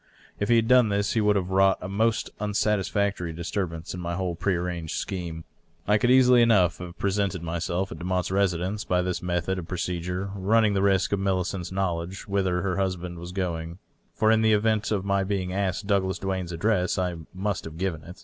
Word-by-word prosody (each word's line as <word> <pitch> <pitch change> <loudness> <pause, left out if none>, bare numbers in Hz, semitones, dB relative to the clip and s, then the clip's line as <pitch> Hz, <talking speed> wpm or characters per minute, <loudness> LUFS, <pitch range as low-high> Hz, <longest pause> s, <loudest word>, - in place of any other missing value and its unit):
If 105 - -1
he 120 - +6
had 115 -1 +3
done 125 -3 +5
this 100 0 0
he 115 - +2
would 105 0 +3
have 95 -1 -1
wrought 95 0 +4
a 90 - -6
most 110 +3 0
unsatisfactory 100 -3 0
disturbance 85 0 -4
in 90 - -6
my 85 0 -3
whole 90 -1 -2
prearranged 85 -2 -2
scheme. 85 -4 -4 0.4
I 105 +1 +4
could 120 - +2
easily 125 -1 +6
enough 95 -7 +4
have 90 +1 -8
presented 100 -3 -1
myself 85 +3 -2
at - - -7
I)emotte's 90 0 -1
residence, 95 +1 0
by 90 0 +1
this 90 -1 -2
method 90 +1 -1
of 85 - -8
procedure 90 +1 -3
running 105 +2 +2
the 95 - +1
risk 95 -2 +2
of 100 - +1
Millicent's 95 -2 -1
knowledge 95 -1 -3
whither 95 -2 0
her 95 -2 -1
husband 90 -3 -2
was 85 +1 -7
going 85 -3 -3 0.2
— - - -42
for 110 - +3
in 110 0 +4
the 110 -1 +4
event 110 0 +1
of 100 -3 -1
my 100 0 +1
being 95 -2 -2
askei 95 0 -1
Douglas 95 -2 +1
Duane's 95 -2 -3
address 90 +2 +1
I 90 -2 -1 0.2
must 100 0 -2
have 80 0 -8
given 85 -4 -2
it. 90 +1 -11
95 Hz, 200 wpm, -26 LUFS, 90-100 Hz, 0.4 s, he